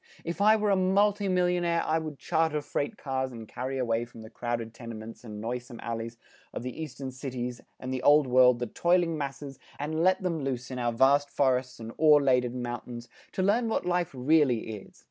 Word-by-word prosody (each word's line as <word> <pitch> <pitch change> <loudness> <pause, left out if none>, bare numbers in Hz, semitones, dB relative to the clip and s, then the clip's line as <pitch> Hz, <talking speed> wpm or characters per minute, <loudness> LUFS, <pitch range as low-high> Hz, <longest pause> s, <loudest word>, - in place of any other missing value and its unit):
If 170 +3 -3
I 215 +1 +6
were 210 -1 +1
a - - +4
multi 200 +2 +2
millionaire 175 -2 +1
I 160 +1 +1
would 155 -3 -6
charter 160 -1 0
freight 145 +8 -3
cars 130 -1 -2
and 115 -2 -9
carry 130 +4 -4
away 115 -2 0
from 115 -2 -11
the 110 - -12
crowded 120 -1 -3
tenements 115 -1 -9
and 105 -3 -8
noisome 120 +2 -5
alleys 115 0 -4 0.4
of - - -4
the 125 +5 -6
eastern 135 -3 -6
cities 125 -2 -5 0.2
and 130 0 -4
the 130 - -2
Old 145 +2 +6
World 125 -1 +5
the 120 - -2
toiling 170 +6 +1
masses, 140 -2 -5 0.2
and 155 +2 -2
let 185 +1 +3
them 165 -5 -1
loose 130 -1 -3
in 125 - -4
our 120 -1 0
vast 140 +4 +3
forests 130 -3 0
and 115 0 -7
ore 150 -1 +7
laden 125 -2 +1
mountains 120 0 -6 0.2
to 185 - -1
learn 225 +4 +2
what 220 - -1
life 175 -1 +1
really 130 -3 +2
is!" 100 -2 -11
135 Hz, 200 wpm, -28 LUFS, 120-165 Hz, 0.4 s, ore